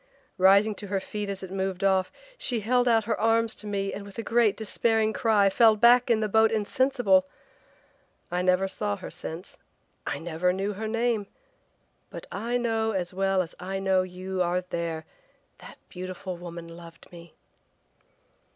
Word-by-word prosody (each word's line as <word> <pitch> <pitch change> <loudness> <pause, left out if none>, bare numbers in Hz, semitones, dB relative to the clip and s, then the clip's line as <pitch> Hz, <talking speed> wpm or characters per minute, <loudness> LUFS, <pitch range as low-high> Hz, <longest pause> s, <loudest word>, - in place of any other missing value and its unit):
Rising 200 +3 +5
to 205 - -7
her 195 0 -1
feet 205 +1 -5
as 195 -1 -5
it 185 - -8
moved 190 -1 -3
off, 190 -1 +2 0.2
she 245 - -2
held 245 +3 +2
out 225 -2 +4
her 225 - -2
arms 225 0 +2
to 210 - -9
me 195 -1 -2
and 200 - -6
with 200 -1 -13
a 230 - -3
great 230 -3 +2
despairing 220 0 +1
cry 210 -3 +3
fell 220 +2 +5
back 240 +3 +5
in 225 -2 +3
the 215 - +1
boat 220 +2 +4
insensible! 215 -3 +2 1.0
I 180 +1 0
never 185 +1 +2
saw 205 +1 -2
her 190 - -9
since, 170 0 -8 0.5
I - - -2
never 170 +3 -1
knew 195 +2 -2
her 220 +3 -5
name, 230 -2 0 0.8
but - - -8
I 235 +4 -2
know 225 -2 0
as 180 -2 -3
well 195 0 +1
as 165 - -11
I 190 +2 -4
know 190 -1 +2
you 185 +1 -4
are 180 +1 +1
there 170 -3 -4 0.5
that - - -12
beautiful 185 0 -6
woman 170 -1 -8
loved 165 0 -13
me!" 170 -1 -13
195 Hz, 170 wpm, -27 LUFS, 185-220 Hz, 1.0 s, Rising